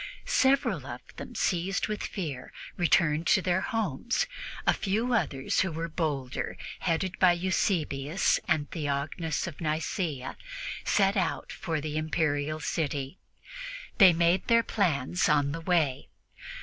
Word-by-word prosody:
Several 275 +1 +2
of - - -6 0.2
them, - - -8
seized 185 +2 0
with 210 -1 -3
fear, 150 - -5 0.2
returned 165 -2 +2
to - - +5
their 180 0 +2
homes; 225 - -1 0.4
a - - +5
few 220 +5 0
others, 140 - 0
who 190 - +2
were 165 +1 -3
bolder, 145 -6 -2 0.2
headed 180 +2 -1
by 180 -2 +6
Eusebius 170 -3 +1
and 155 -4 +1
Theognis 150 +1 -2
of 170 -4 -8
Nicea, 155 -3 -2 0.5
set 195 -1 +3
out 190 - -1
for 160 -3 -3
the 150 0 -3
Imperial 155 -1 0
city. 145 -1 -2 0.8
They 190 -4 +10
made 170 +2 +2
their 230 -1 +5
plans 175 - +1
on 145 -1 +3
the 165 +3 -4
way. 160 -7 +1
165 Hz, 130 wpm, -28 LUFS, 150-190 Hz, 0.8 s, They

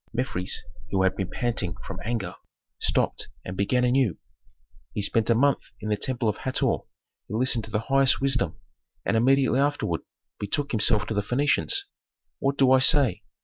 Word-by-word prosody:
Mefres, 115 -6 -2 0.3
who 95 -1 +1
had 95 - +2
been 95 -2 -3
panting 115 -9 -2
from - - -7
anger, 115 -2 -3 0.5
stopped - - 0 0.2
and 90 - -5
began 125 +6 +1
anew, 125 - +2 0.8
"He 105 - -2
spent 110 +2 +1
a 115 - +4
month 140 +4 +3 0.2
in 110 - -5
the 105 - +2
temple 120 +2 -2
of 105 - 0
Hator, 130 - 0 0.5
he 105 - -5
listened 120 -2 +1
to - - -12
the 105 0 -1
highest 135 +2 +3
wisdom, 135 -2 0 0.5
and - - +1
immediately 130 +3 +3
afterward 140 - 0 0.4
betook 140 +8 -2
himself 105 -1 +3
to 110 - -4
the 105 - 0
Phœnicians. 140 - +1 0.6
What 140 0 0
do 135 -1 +4
I 130 - +6
say? 130 - +5
120 Hz, 170 wpm, -25 LUFS, 105-135 Hz, 0.8 s, I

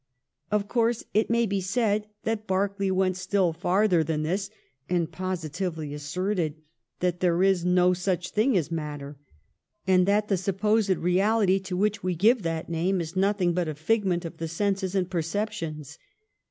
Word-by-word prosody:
Of 210 -1 0
course 235 0 +1
it 215 +1 +2
may 235 0 +3
be 200 -2 -1
said 210 +1 0 0.2
that 220 -1 -2
Berkeley 195 +1 0
went 185 -1 +1
still 185 -2 +1
farther 180 +1 +2
than 155 0 -1
this, 195 +5 -1 0.4
and 175 -3 0
positively 170 -3 -4
asserted 160 +2 -2 0.5
that 180 -1 0
there 180 0 +2
is 190 -3 +3
no 180 0 +4
such 180 -1 -2
thing 220 +1 +2
as 165 -2 -1
matter, 145 -3 -5 0.7
and 185 -1 +4
that 205 +1 +2
the 195 - +1
supposed 205 +3 +1
reality 190 +2 +2
to 190 -1 -5
which 210 +1 +1
we 180 -1 -1
give 220 +7 +4
that 165 -2 -3
name 175 +3 0
is 165 0 -5
nothing 190 -2 +2
but 175 -1 0
a 155 - -3
figment 180 +1 0
of 165 - -7
the 165 - -3
senses 195 +2 -1
and 185 -1 0
perceptions. 165 -4 -3
185 Hz, 165 wpm, -26 LUFS, 170-200 Hz, 0.7 s, no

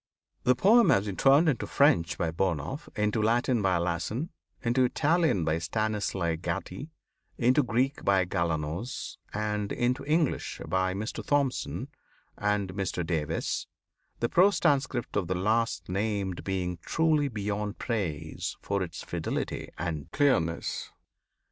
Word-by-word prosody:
The 125 - +5
poem 220 - +5
has 100 +1 +4
been 100 -2 -3
turned 140 - +5
into 140 -7 +1
French 140 - +3
by 85 -2 0
Burnouf, 90 - -2
into 105 +1 +1
Latin 120 +2 +2
by 95 -3 +2
Lassen, 85 - -2 0.3
into 125 +2 +3
Italian 155 - +2
by 80 +1 +1
Stanislav 95 -3 -1
Gatti, 130 - -4 0.5
into 130 +4 +4
Greek 130 +2 0
by 95 -2 +3
Galanos, 85 - -3
and 105 -1 -2
into 125 +3 0
English 155 0 0
by 95 0 +1
Mr. 110 +3 -4
Thomson 140 -3 0 0.5
and 105 -2 0
Mr 95 -3 -2
Davies, 80 -4 -2 0.5
the 120 - +3
prose 190 +9 +4
transcript 135 -4 +1
of 100 -4 0
the 95 - -1
last 95 -3 0
named 100 -1 -2
being 90 -2 -2
truly 155 - +2
beyond 105 -2 -3
praise 80 -10 -3
for 100 0 -1
its 85 -2 -5
fidelity 85 -2 -3
and 80 -1 -4
clearness. 85 - +1
105 Hz, 130 wpm, -28 LUFS, 90-130 Hz, 0.5 s, The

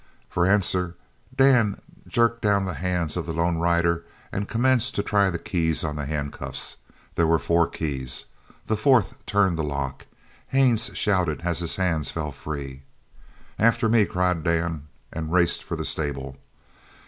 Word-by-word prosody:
For 90 0 +2
answer 90 -3 +2 0.4
Dan 125 -6 +4 0.3
jerked 115 0 +2
down 100 -2 +2
the 90 - -3
hands 85 0 -2
of 85 -2 -3
the 80 - -3
lone 85 0 +1
rider 85 0 +2 0.3
and 100 +1 -3
commenced 130 +1 +2
to 100 - 0
try 100 -2 +2
the 85 - -2
keys 80 -2 0
on 75 -2 -2
the 75 -2 -4
handcuffs. 70 -1 -3 0.4
There 85 - +2
were 80 0 +4
four 85 +1 +2
keys. 65 -5 -2 0.4
The 110 - 0
fourth 115 0 +2
turned 95 -5 +2
the - - 0
lock. 70 -2 -4 0.4
Haines 130 -4 +3
shouted 90 -8 +1
as 85 -1 0
his 85 -2 0
hands 85 -5 0
fell 75 -2 -4
free. 70 -1 -7 0.8
"After 115 +1 +3
me!" 110 -2 +4
cried 90 -2 0
Dan, 85 -3 -1 0.3
and 80 -1 -4
raced 85 -1 +2
for - - -4
the - - -4
stable. 70 -3 -2
85 Hz, 160 wpm, -24 LUFS, 80-100 Hz, 0.8 s, Dan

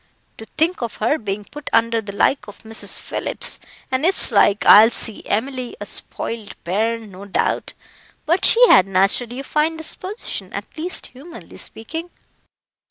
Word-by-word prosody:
To 220 - -8
think 335 +2 +1
of 235 -2 -4
her 240 +8 0
being 205 -1 -4
put 295 +5 -9
under 230 0 +2
the 205 -2 -8
like 210 +3 +1
of 205 - -13
Mrs. 220 0 -4
Phillips; - - -2 0.3
and 260 +2 0
it's 370 +4 +4
like 205 0 +3
I'll 220 +2 +9
see 225 -2 +1
Emily 255 - -2
a - - -6
spoiled 225 -3 -3
bairn, 220 +4 -2
no 190 +2 -11
doubt 200 - -1 0.5
but 340 +4 +1
she 485 +1 +7
had 190 - +6
naturally 195 +6 +1
a - - -5
fine 310 +3 0
disposition, 370 +6 -5
at - - -7
least 340 +4 -1
humanly 300 +7 -12
speaking." 325 +10 -7
230 Hz, 160 wpm, -20 LUFS, 210-310 Hz, 0.5 s, I'll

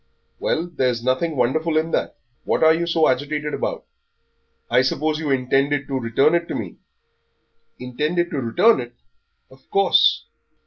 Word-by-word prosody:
"Well, 165 - -1
there's 125 -9 -2
nothing 130 +6 0
wonderful 155 +6 0
in 160 +1 0
that. - - -2 0.3
What - - 0
are 160 0 +6
you 170 +1 -2
so 165 -2 +2
agitated 145 +3 -2
about? - - -3 0.8
I 125 - +3
suppose 150 +4 -1
you 155 -2 -3
intended 135 +2 0
to 135 -1 -1
return 125 +6 +2
it 170 0 0
to - - -4
me?" - - -6 1.0
"Intended 150 +8 -2
to 145 - -2
return 180 - +3
it! 120 0 -8 0.6
Of 130 0 -21
course." 195 0 +3
150 Hz, 150 wpm, -21 LUFS, 130-165 Hz, 1.0 s, are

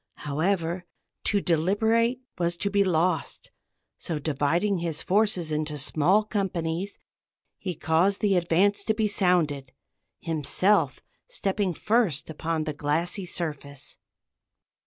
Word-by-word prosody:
However, 170 +3 -1 0.4
to 205 -2 +2
deliberate 220 +9 +2 0.2
was 170 0 0
to 200 +3 -2
be 200 0 +4
lost; 175 -3 0 0.5
so, 165 - -4
dividing 160 +6 0
his 165 -2 -3
forces 190 -5 +1
into 150 0 -2
small 155 +8 +2
companies, 190 -3 -2 0.6
he 180 -3 -4
caused 170 +7 +2
the 200 -2 +2
advance 185 +4 +2
to 220 - +1
be 215 -1 +1
sounded, 160 -9 +1 0.5
himself 165 +5 +1 0.3
stepping 200 - -1
first 205 - +1
upon 160 0 -2
the 155 -1 -3
glassy 165 +6 -1
surface. 145 -5 -5
175 Hz, 115 wpm, -26 LUFS, 155-200 Hz, 0.6 s, be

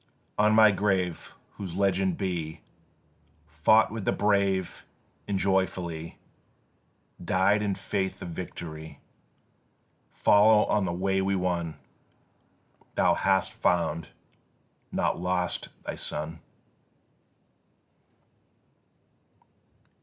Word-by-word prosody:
On 105 +1 +4
my 110 -1 +7
grave, 95 -4 -1 0.2
whose 95 -4 -6
legend 95 -2 +1
be 85 -5 -3 0.8
Fought 80 +10 +3
with 110 -2 -5
the - - +1
brave 100 -3 0 0.4
and 100 - 0
joyfully 90 -4 -1 1.1
Died 95 +4 +2
in 100 -2 -1
faith 95 0 -3
of 90 - -6
victory. 80 -2 -7 1.1
Follow 105 +1 +5
on 105 -2 +1
the 85 - -1
way 95 +2 0
we 95 +1 0
won! 85 -3 -1 1.2
Thou - - +4
hast 95 -1 +1
found, 85 -3 0 0.8
not - - 0
lost 90 0 -1
thy - - -4
son." 80 +2 -5
95 Hz, 90 wpm, -27 LUFS, 85-100 Hz, 1.2 s, my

